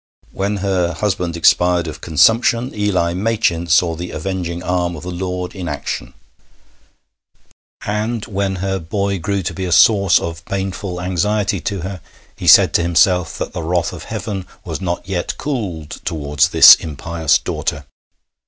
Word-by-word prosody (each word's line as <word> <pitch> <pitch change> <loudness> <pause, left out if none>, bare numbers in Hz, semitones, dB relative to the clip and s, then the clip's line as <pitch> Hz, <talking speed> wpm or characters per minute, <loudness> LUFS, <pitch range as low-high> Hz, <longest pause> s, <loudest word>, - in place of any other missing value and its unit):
When 100 +2 -2
her 90 -3 0
husband 90 -3 -2
expired 90 +1 +3
of 75 -1 -8
consumption, 115 - +2
Eli 100 -5 0
Machin 95 -4 0
saw 85 0 +3
the 90 +2 -6
avenging 85 +1 -4
arm 90 -1 -1
of 75 - -9
the 90 - -5
Lord 90 0 -4
in 90 -4 -5
action; 70 - -5 1.7
and 110 +2 -2
when 100 -2 -2
her 95 0 -1
boy 100 +3 -2
grew 100 +2 -2
to 85 0 -3
be 95 - -5
a 90 - -3
source 100 +4 +5
of 85 0 -6
painful 95 -1 -4
anxiety 100 +3 0
to 100 -3 -3
her, 95 0 -6 0.3
he - - -6
said - - +7
to - - +3
himself 85 0 +2
that - - -5
the - - -4
wrath 85 +1 -1
of - - -9
Heaven 95 -4 -5 0.2
was - - -5
not 85 -1 -3
yet 90 -3 -3
cooled 95 - -4
towards 75 -3 0
this - - +10
impious 80 +1 0
daughter. 70 0 -4
90 Hz, 155 wpm, -18 LUFS, 85-100 Hz, 1.7 s, this